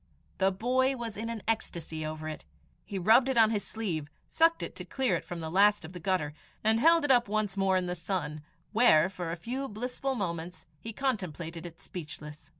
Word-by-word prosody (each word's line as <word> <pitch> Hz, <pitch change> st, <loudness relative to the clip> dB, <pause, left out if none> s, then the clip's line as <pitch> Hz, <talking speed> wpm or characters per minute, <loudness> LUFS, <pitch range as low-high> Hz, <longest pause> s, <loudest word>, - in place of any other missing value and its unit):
The 190 Hz, 0 st, +4 dB
boy 255 Hz, +7 st, +1 dB
was 235 Hz, -3 st, -5 dB
in 225 Hz, +2 st, -4 dB
an 230 Hz, -3 st, -5 dB
ecstasy 170 Hz, -8 st, -2 dB
over 155 Hz, 0 st, -5 dB
it. 155 Hz, -, -6 dB, 0.4 s
He 200 Hz, -, -5 dB
rubbed 225 Hz, +8 st, +5 dB
it 265 Hz, -, 0 dB
on 220 Hz, -1 st, +6 dB
his 210 Hz, -2 st, -1 dB
sleeve, 170 Hz, -10 st, -3 dB, 0.2 s
sucked 330 Hz, +1 st, +3 dB
it -, -, -6 dB
to -, -, -5 dB
clear 265 Hz, -2 st, 0 dB
it -, -, -3 dB
from 175 Hz, -1 st, -6 dB
the 160 Hz, 0 st, -4 dB
last 205 Hz, 0 st, +4 dB
of 160 Hz, -, -10 dB
the 180 Hz, -, -7 dB
gutter, 165 Hz, -5 st, 0 dB, 0.3 s
and 220 Hz, +1 st, +4 dB
held 330 Hz, +3 st, +5 dB
it 280 Hz, -, +3 dB
up 245 Hz, -3 st, +5 dB
once 210 Hz, -1 st, -1 dB
more 195 Hz, -1 st, +3 dB
in 185 Hz, -, 0 dB
the 180 Hz, -, -2 dB
sun, 170 Hz, -4 st, -3 dB, 0.3 s
where, 185 Hz, -7 st, +5 dB
for 175 Hz, -3 st, -5 dB
a -, -, -2 dB
few 255 Hz, +10 st, -4 dB
blissful 250 Hz, +4 st, -3 dB
moments, 175 Hz, -4 st, -4 dB
he 225 Hz, -, -6 dB
contemplated 175 Hz, -, -3 dB
it 165 Hz, -1 st, -13 dB
speechless. 150 Hz, -4 st, -9 dB
195 Hz, 210 wpm, -30 LUFS, 170-230 Hz, 0.4 s, on